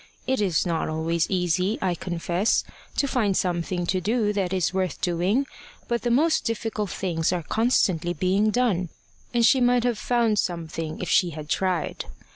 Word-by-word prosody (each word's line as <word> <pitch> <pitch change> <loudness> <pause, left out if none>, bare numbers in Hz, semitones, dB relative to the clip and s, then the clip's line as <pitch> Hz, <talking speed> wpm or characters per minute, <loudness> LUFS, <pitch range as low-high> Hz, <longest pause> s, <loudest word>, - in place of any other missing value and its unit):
It 260 -3 0
is 185 -5 +1
not 165 -3 -1
always 160 +1 0
easy, 180 +3 +1
I 185 -2 0
confess, 175 +4 0 0.3
to 280 - +1
find 215 -8 +1
something 175 0 -1
to 185 +1 0
do 215 +1 +1
that 195 -3 -1
is 185 -2 0
worth 185 -1 -1
doing, 185 +9 +1 0.4
but 235 -1 -1
the 240 - -1
most 310 +7 +3
difficult 225 -3 -2
things 170 -4 -1
are 180 -2 -2
constantly 185 -5 +1
being 195 +4 +2
done, 210 -7 +1 0.4
and 235 -1 +3
she 260 +2 +5
might 245 -1 +3
have 240 -3 0
found 230 -4 +1
something 165 -2 -3
if 180 - -3
she 180 - +4
had 150 0 -7
tried. 185 -2 -1
190 Hz, 170 wpm, -25 LUFS, 175-230 Hz, 0.4 s, she